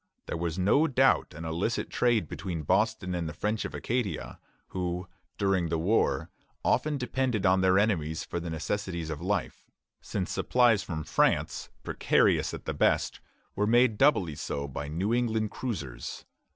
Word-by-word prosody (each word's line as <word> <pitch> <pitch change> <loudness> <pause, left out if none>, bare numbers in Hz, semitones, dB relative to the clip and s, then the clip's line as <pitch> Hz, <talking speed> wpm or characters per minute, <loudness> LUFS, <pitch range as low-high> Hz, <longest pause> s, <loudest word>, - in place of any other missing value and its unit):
There - - -4
was 85 0 -2
no 105 - +4
doubt 130 - +3
an 80 +2 -7
illicit 85 +8 -2
trade 120 -3 +2
between 85 -5 -4
Boston 105 +2 +1
and 85 -2 -2
the 80 - -8
French 105 +5 -1
of - - -5
Acadia, 120 -4 -2 0.3
who 90 -1 -3 0.3
during 95 -4 +1
the 85 - 0
war 95 +8 +1 0.3
often 150 -1 +2
depended 125 -5 -1
on 95 0 +4
their 95 0 +4
enemies 80 -7 +1
for 85 - -4
the 85 0 -5
necessaries 85 0 -3
of 75 0 -5
life, 100 +3 -2 0.3
since - - -3
supplies 120 -5 +3
from 80 -3 -4
France, - - +1
precarious - - +2
at - - -8
the - - -2
best, - - +1 0.4
were 105 - +1
made 120 -1 +4
doubly 120 - +4
so 70 0 -4
by 70 +1 -5
New 90 +9 -1
England 110 -3 0
cruisers. 80 - -5
95 Hz, 160 wpm, -29 LUFS, 85-115 Hz, 0.4 s, no